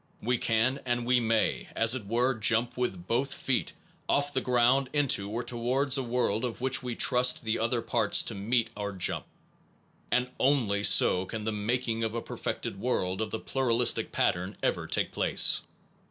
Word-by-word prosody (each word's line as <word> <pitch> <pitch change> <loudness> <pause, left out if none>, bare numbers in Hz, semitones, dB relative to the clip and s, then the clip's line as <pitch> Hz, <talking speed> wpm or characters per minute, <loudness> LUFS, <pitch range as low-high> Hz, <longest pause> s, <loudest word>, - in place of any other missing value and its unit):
We 125 +1 0
can 120 +4 +1
and 120 -1 -2
we 125 +1 +3
may, 115 -1 0
as 115 +1 +4
it 120 -6 -4
were, 120 +4 +1
jump 115 +2 +1
with 95 -8 -3
both 125 +7 -1
feet 130 -2 -1 0.4
off 145 0 +1
the 130 - 0
ground 125 +2 +2
into 135 -9 +1
or 115 +3 -3
towards 130 +3 0
a 135 - 0
world 120 -3 -1
of 120 -2 -4
which 130 +1 0
we 125 -2 -5
trust 125 -1 +3
the 110 0 -1
other 115 +1 -1
parts - - +3
to - - 0
meet 115 +3 -1
our 100 -1 -5
jump 90 -2 -1 0.8
and 125 0 0
only 115 -8 +1
so 95 -2 +5
can 110 +1 -6
the 110 - -2
making 115 +2 -2
of 110 0 -2
a 115 - -2
perfected - - -5
world 90 +3 -1
of 110 - -2
the 110 - -4
pluralis 125 -3 +1
tic - - -5
pattern 90 +3 -1
ever - - -1
take - - 0
place. - - +4
120 Hz, 185 wpm, -28 LUFS, 110-125 Hz, 0.8 s, so